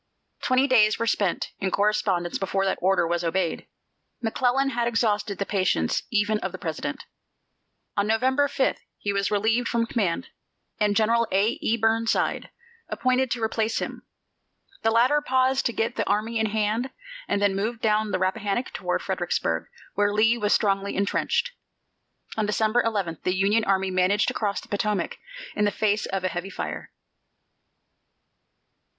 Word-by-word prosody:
Twenty 255 +1 +3
days 220 -6 +4
were 230 - -1
spent 200 -5 0
in 195 - 0
correspondence 200 -3 0
before 195 0 0
that 190 - 0
order 190 -1 +3
was 170 +1 -1
obeyed. 170 0 -1 0.5
McClellan 250 +4 +1
had 235 -1 0
exhausted 210 -4 0
the 200 - -2
patience 185 - +1
even 215 -1 +1
of - - -3
the - - -7
President. - - -4 0.9
On 200 0 +1
November 260 +6 +2
5 275 -1 0 0.2
he 205 - -2
was 200 0 0
relieved 220 +3 +1
from 235 -1 +1
command, 220 -1 -1 0.5
and 210 -1 +2
General 230 +2 +3
A. 195 +3 +3
E. 230 - +1
Burnside 225 +1 +1 0.4
appointed 255 0 +1
to 230 -1 -2
replace 220 0 0
him. - - -4 0.8
The 225 - +2
latter 245 +6 +4
paused 260 -1 +2
to - - -2
get 230 +1 -2
the - - -1
army 220 +3 0
in 220 - +2
hand 215 +4 0 0.4
and - - 0
then 200 -1 +2
moved 220 +4 -2
down 215 -1 +2
the 185 - 0
Rappahannock 200 +5 -1
toward - - -2
Fredericksburg, - - -1 0.3
where 205 0 +2
Lee 220 +3 +3
was 210 -3 -1
strongly 200 -1 +1
intrenched. 200 - 0 0.9
On 215 -1 +1
December 220 +3 +2
11 200 -9 -2
the 180 - 0
Union 205 +4 +2
army 190 -1 +1
managed 185 +3 +2
to - - -4
cross 205 -2 -1
the - - -15
Potomac 205 -3 -1 0.4
in 210 - +1
the - - +3
face 210 0 0
of 195 -1 -3
a - - +2
heavy 185 +1 -4
fire. - - -5
210 Hz, 160 wpm, -25 LUFS, 195-230 Hz, 0.9 s, days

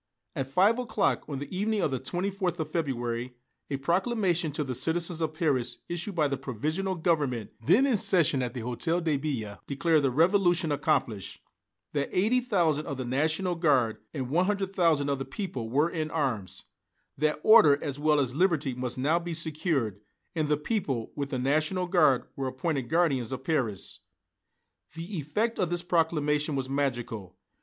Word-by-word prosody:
At 135 - -2
five 200 - +4
o'clock, 220 -4 0
on 140 - -3
the 145 +6 -6
evening 210 +3 0
of 150 - +1
the 130 - -1
24th 180 +3 -2
of 155 -2 -4
February, 125 -6 -2 0.3
a 140 - -1
proclamation 175 - 0
to 150 - -1
the 130 -2 -4
citizens 165 +5 -1
of 155 -1 -1
Paris, 130 -7 0
issued 175 +3 -4
by 155 -3 +3
the 140 -1 -2
Provisional 155 - -2
Government 145 - 0
then 255 - +5
in 260 -6 +2
session 170 -8 +3
at 125 +1 -3
the 125 - -3
Hôtel 160 +9 -1
de 160 -3 +1
Ville, 125 -8 -4
declared 155 +3 +2
the 135 - +2
Revolution 175 +3 +3
accomplished 115 -7 -1 0.5
that 145 -1 -1
eighty 220 +7 +2
thousand 170 -11 +1
of 140 -4 -4
the 130 - -4
National 155 +8 0
Guard 140 -10 +2
and 130 -3 -4
one 180 +4 +2
hundred 200 -2 -1
thousand 160 -5 +3
of 140 -1 0
the - - -2
people 135 - -5
were 150 +7 +2
in 155 -2 -2
arms 125 - -2 0.5
that 150 +1 0
order 215 -11 +7
as 145 -2 -4
well 150 0 +3
as 130 -3 0
liberty 155 -4 +1
must 125 0 -3
now 150 +6 +2
be 170 -1 -5
secured, 150 - -1 0.3
and 155 -3 0
the 150 0 +2
people, 150 - -2
with 140 -1 -3
the 135 - -2
National 155 +8 +1
Guard, 155 -8 +3
were 135 -1 -2
appointed 130 -1 -2
guardians 145 -9 +1
of 130 0 -5
Paris. 125 - -2 1.0
The 170 +4 -6
effect 210 +11 -1
of 180 - +1
this 175 0 -1
proclamation 155 -3 +1
was 135 -1 -2
magical. 120 -8 -3
150 Hz, 175 wpm, -28 LUFS, 135-175 Hz, 1.0 s, order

